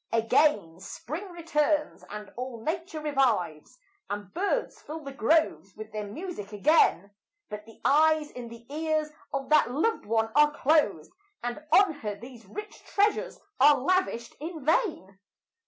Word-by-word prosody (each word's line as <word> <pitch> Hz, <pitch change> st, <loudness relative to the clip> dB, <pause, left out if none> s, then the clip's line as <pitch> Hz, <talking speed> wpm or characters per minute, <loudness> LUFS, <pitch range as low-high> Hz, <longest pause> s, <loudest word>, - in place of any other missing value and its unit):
Again 220 Hz, -, +2 dB
spring 310 Hz, -, -7 dB
returns, 305 Hz, -3 st, 0 dB
and 210 Hz, 0 st, -8 dB
all 250 Hz, -1 st, -5 dB
nature 330 Hz, +1 st, -3 dB
revives, 250 Hz, -, 0 dB, 0.3 s
And 205 Hz, -1 st, -5 dB
birds 400 Hz, +8 st, -1 dB
fill 315 Hz, +2 st, -7 dB
the 275 Hz, -, -7 dB
groves 270 Hz, -, +1 dB
with 215 Hz, 0 st, -9 dB
their 210 Hz, -1 st, -4 dB
music 250 Hz, -, -7 dB
again; 205 Hz, -, +3 dB, 0.4 s
But 210 Hz, +1 st, -8 dB
the 225 Hz, -, -16 dB
eyes 310 Hz, +1 st, +4 dB
and 245 Hz, -2 st, -8 dB
the 235 Hz, 0 st, -12 dB
ears 310 Hz, 0 st, -1 dB, 0.2 s
of 270 Hz, -1 st, -3 dB
that 305 Hz, -4 st, +5 dB
loved 315 Hz, -, 0 dB
one 225 Hz, 0 st, +1 dB
are 295 Hz, 0 st, +4 dB
closed, 260 Hz, -, +2 dB, 0.3 s
And 245 Hz, +5 st, -4 dB
on 390 Hz, 0 st, +6 dB
her 210 Hz, -4 st, -4 dB
these 235 Hz, 0 st, -13 dB
rich 420 Hz, -, -9 dB
treasures 430 Hz, +4 st, 0 dB, 0.2 s
are 290 Hz, +2 st, +7 dB
lavished 275 Hz, -5 st, 0 dB
in 315 Hz, -2 st, -7 dB
vain. 305 Hz, -, 0 dB
280 Hz, 145 wpm, -28 LUFS, 215-315 Hz, 0.4 s, are